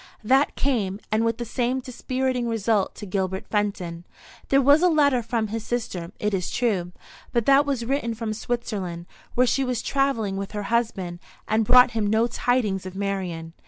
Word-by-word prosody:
That 265 +6 +3
came, 210 -8 0
and 215 +1 +2
with 230 0 0
the 240 - -4
same 250 +2 -1
dispiriting 255 0 -2
result 220 -3 0
to 210 - -8
Gilbert 190 -1 -2
Fenton. 185 -5 -2 0.5
There 275 - +5
was 285 +3 +5
a 360 - +5
letter 285 -6 +3
from 225 -1 -2
his 225 0 -4
sister, 190 -8 -3
it 210 0 -1
is 180 -2 -1
true; 195 -8 0 0.4
but 235 -2 +1
that 275 +1 +5
was 260 -5 -1
written 235 -3 -1
from 220 -1 -3
Switzerland, 205 -7 -4 0.3
where 250 - +4
she 270 +2 +1
was 250 -3 -2
travelling 230 -8 0
with 195 +1 -5
her 210 -1 -3
husband, 190 -7 -1 0.3
and 220 0 +2
brought 250 +2 +7
him 220 -3 0
no 220 +2 +3
tidings 225 -6 0
of 185 - -9
Marian. 185 -5 -3
225 Hz, 180 wpm, -24 LUFS, 195-250 Hz, 0.5 s, brought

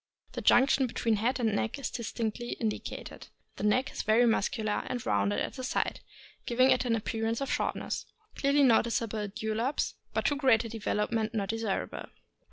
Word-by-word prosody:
The - - -5
junction 265 +1 +4
between 225 -2 0
head 250 +5 0
and 220 -3 +1
neck 220 +5 -1
is 275 - -4
distinctly 235 0 -3
indicated. 220 -2 -5 0.3
The - - -5
neck 250 +6 +2
is - - -4
very 225 +3 +4
muscular, 215 -1 +1
and 245 -2 -4
rounded 100 0 +1
at - - -3
the 260 - -7
sides, 250 - -1 0.5
giving 255 +2 +4
it 255 0 +2
an 235 -2 +2
appearance 225 +1 -2
of 275 - -2
shortness. - - -2 0.3
Clearly 280 +1 +3
notice 235 -2 +4
able 215 -2 -3
dewlaps, 220 +5 -2 0.2
but - - -1
a - - +5
too 290 - -1
great 260 -6 +4
development 220 0 -1
not 200 -3 -1
desirable. 225 -3 -2
230 Hz, 175 wpm, -30 LUFS, 215-250 Hz, 0.5 s, a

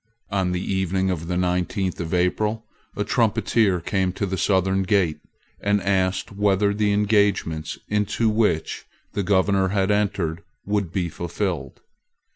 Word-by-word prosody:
On 95 -2 +1
the 90 - -1
evening 95 0 0
of 85 -2 -4
the 90 0 -1
nineteenth 90 +1 -1
of 80 -2 -4
April, 105 +5 0 0.3
a - - -1
trumpeter 100 -6 +2
came 95 +2 0
to 100 - -2
the 95 0 -2
southern 95 0 +2
gate, 95 -5 +1 0.4
and 100 0 +1
asked 95 0 0
whether 100 0 +2
the 105 0 +1
engagements 100 -6 +1
into 105 +2 0
which 105 -7 0 0.3
the 100 - -1
Governor 95 0 +2
had 95 +1 +1
entered 100 -5 0 0.2
would 100 -4 -1
be 90 -2 -1
fulfilled. 85 -4 -4
95 Hz, 140 wpm, -23 LUFS, 90-105 Hz, 0.4 s, trumpeter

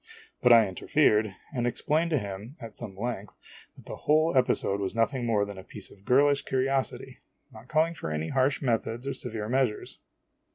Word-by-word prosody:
but 125 - +5
I 115 -3 +7
interfered, 105 0 +2 0.2
and 120 -3 0
ex 120 - -2
plained 160 +3 +1
to 155 - +2
him, 100 +3 -6
at 115 -3 -9
some 100 -5 -8
length, 105 -2 -4 0.4
that - - -16
the - - -7
whole 155 +1 +2
episode 125 -6 +2
was 100 +2 -3
nothing 120 +2 0
more 105 -3 +2
than 100 -2 -8
a - - -10
piece - - -9
of 100 0 -18
girlish 140 +2 +4
curiosity, 135 0 -1 0.3
not 110 +2 -14
calling 160 +3 +2
for 155 - -6
any 75 +1 -2
harsh 135 +2 +1
methods 120 0 -1
or 140 - -1
severe 110 -4 -5
measures. 125 -3 -1
120 Hz, 190 wpm, -28 LUFS, 105-135 Hz, 0.4 s, I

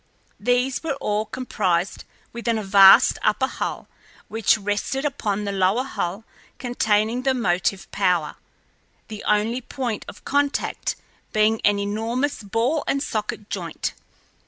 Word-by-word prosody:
These 245 +4 +1
were 315 -4 -2
all 210 -5 -1
comprised 195 -8 -1 0.3
within 235 -1 -1
a 215 - -3
vast 195 0 +7
upper 215 +5 +2
hull, - - -4 0.4
which 220 -1 +3
rested 210 +7 -2
upon 210 -8 -1
the 200 - -2
lower 195 +5 +2
hull 200 -6 -4 0.3
containing 225 -1 +1
the 265 0 +1
motive 190 -3 0
power, 180 -6 0 0.7
the 215 -1 -7
only 215 +4 +1
point 245 -3 -4
of - - -11
contact 285 0 0 0.4
being 215 +1 +3
an 205 -1 +4
enormous 225 +7 -1
ball 230 +9 0
and 275 0 0
socket 210 -4 -4
joint. - - -3
220 Hz, 130 wpm, -23 LUFS, 205-250 Hz, 0.7 s, vast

